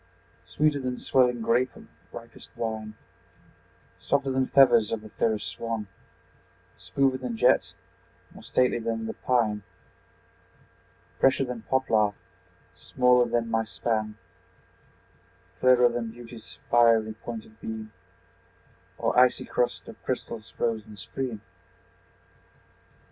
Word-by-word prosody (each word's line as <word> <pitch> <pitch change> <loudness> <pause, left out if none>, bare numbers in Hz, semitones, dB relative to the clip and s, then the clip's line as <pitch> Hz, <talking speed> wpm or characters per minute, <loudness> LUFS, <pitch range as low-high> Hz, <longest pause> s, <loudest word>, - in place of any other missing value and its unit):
Sweeter 150 -1 +1
than 125 -2 -3
swelling 125 -3 +2
grape 120 +1 +1
of - - -13 0.3
ripest - - -11
wine, 110 -1 -4 1.0
Softer 140 -1 0
than 130 0 +1
feathers 120 -6 +5
of 115 - -2
the 110 - -11
fairest 110 -1 -1
swan, 115 -2 -4 0.9
Smoother 135 -1 0
than 125 -3 -4
jet, - - +3 0.6
more - - -13
stately 125 -1 +1
than 115 -1 -3
the 110 - -4
pine, 110 -5 0 1.6
Fresher 135 0 +3
than 125 -2 -6
poplar, 110 -6 +2 0.6
smaller 125 -1 +3
than 115 -1 -1
my 110 0 +2
span, 110 -1 -2 1.4
Clearer 125 -1 +6
than 120 -1 -3
beauty's 115 -1 -11
fiery 115 -2 +4
pointed 110 -1 -9
beam, 110 -1 -6 1.0
Or - - 0
icy 125 0 +4
crust 125 - -1
of - - -12
crystal's 110 -1 -4
frozen 110 -3 -3
stream. 115 +2 -5
115 Hz, 110 wpm, -27 LUFS, 110-125 Hz, 1.6 s, Clearer